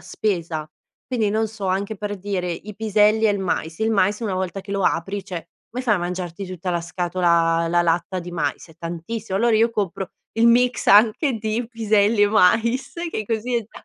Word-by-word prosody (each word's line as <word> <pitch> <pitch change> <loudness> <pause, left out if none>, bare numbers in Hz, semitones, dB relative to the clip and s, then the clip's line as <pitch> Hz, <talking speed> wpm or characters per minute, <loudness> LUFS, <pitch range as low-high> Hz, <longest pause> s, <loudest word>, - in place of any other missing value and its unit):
spesa, 170 -7 -3 0.4
quindi 225 -5 0
non 220 +1 +1
so 210 -3 -6
anche 200 +3 -1
per 205 0 -4
dire 185 -2 -2
i 200 +4 -6
piselli 215 +1 +3
e 210 - +4
il 200 - 0
mais, 165 -3 -2
il 220 0 +1
mais 205 +1 +2
una 210 -5 -2
volta 185 +1 -3
che 200 +1 -8
lo 200 -1 -1
apri 195 +5 0
cioè 175 -4 -7 0.2
come 255 +2 -5
fai 215 -4 +3
a - - 0
mangiarti 180 +1 -4
tutta 180 0 -5
la 170 -1 0
scatola 170 -1 +1
la 175 0 +3
latta 175 +2 0
di 175 0 -7
mais? 150 -2 -2
È 160 - -17
tantissimo, 180 +5 -4
allora 230 +1 +3
io 230 +2 +4
compro 195 -4 -3 0.2
il 230 +1 +4
mix 245 +1 +3
anche 225 +6 +5
di 220 +2 -2
piselli 215 -2 +2
e 205 - +5
mais, 225 +5 +3 0.2
che 215 -8 -3
così 230 +3 -2
è 235 - +2
da 215 - -14
200 Hz, 205 wpm, -22 LUFS, 175-220 Hz, 0.4 s, anche